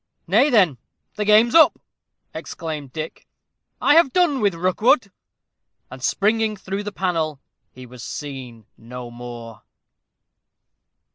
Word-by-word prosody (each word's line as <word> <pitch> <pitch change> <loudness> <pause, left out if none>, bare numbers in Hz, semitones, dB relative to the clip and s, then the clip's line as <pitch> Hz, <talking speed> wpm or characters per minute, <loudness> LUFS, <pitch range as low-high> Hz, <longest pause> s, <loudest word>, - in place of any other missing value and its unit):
"Nay, 220 - +3
then, 185 - +3 0.3
the 210 - -3
game's 215 +3 +5
up!" 330 -1 +6 0.6
exclaimed 155 -5 -6
Dick; 155 +2 -7 0.5
"I 290 - +4
have 325 -4 +5
done 335 -6 +2
with 200 -4 +1
Rookwood." 200 - +2 0.8
And, 130 - -10
springing 215 - +1
through 195 +1 -5
the 205 0 -6
panel, 165 -6 -2 0.3
he 130 0 -12
was 125 0 -12
seen 125 -3 -8
no 120 +1 -9
more. 120 -1 -10
175 Hz, 120 wpm, -21 LUFS, 125-215 Hz, 0.8 s, up